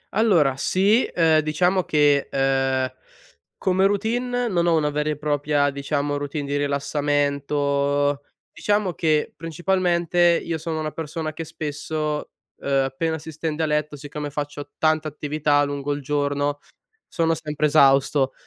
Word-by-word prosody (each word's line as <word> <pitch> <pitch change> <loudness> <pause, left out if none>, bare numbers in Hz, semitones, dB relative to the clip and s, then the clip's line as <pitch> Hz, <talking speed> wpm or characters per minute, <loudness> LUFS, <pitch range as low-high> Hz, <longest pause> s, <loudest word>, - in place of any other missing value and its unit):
Allora, 175 - +3
sì. 200 - +3
Ehm, 160 -2 +3
diciamo 180 +5 +1
che, 145 -2 +3
ehm, 135 -1 +1 0.6
come 190 0 +2
routine 240 +4 -1
non 175 -5 +1
ho 170 - +4
una 150 -1 +1
vera 150 +1 -1
e 150 - -2
propria 145 -1 +1
diciamo 145 +1 -2
routine 145 0 -4
di 140 +1 -2
rilassamento. 145 0 0 0.3
Diciamo 205 -3 0
che 155 -3 0
principalmente 175 +1 +1
io 165 -1 -3
sono 160 0 -3
una 155 -1 -3
persona 160 0 -5
che 165 - -5
spesso, 155 -1 -4 0.3
ehm, 135 -1 +1
appena 160 +5 -2
si 160 +1 -9
stende 160 +1 -3
a - - +2
letto, 150 -1 -1
siccome 145 +1 -6
faccio 145 0 -5
tanta 155 0 +1
attività 150 0 0
lungo 145 0 -2
il 145 - -5
giorno, 145 0 -1 0.5
sono 165 -1 +1
sempre 150 -1 -2
esausto. 140 -2 +4
150 Hz, 140 wpm, -23 LUFS, 145-165 Hz, 0.6 s, ho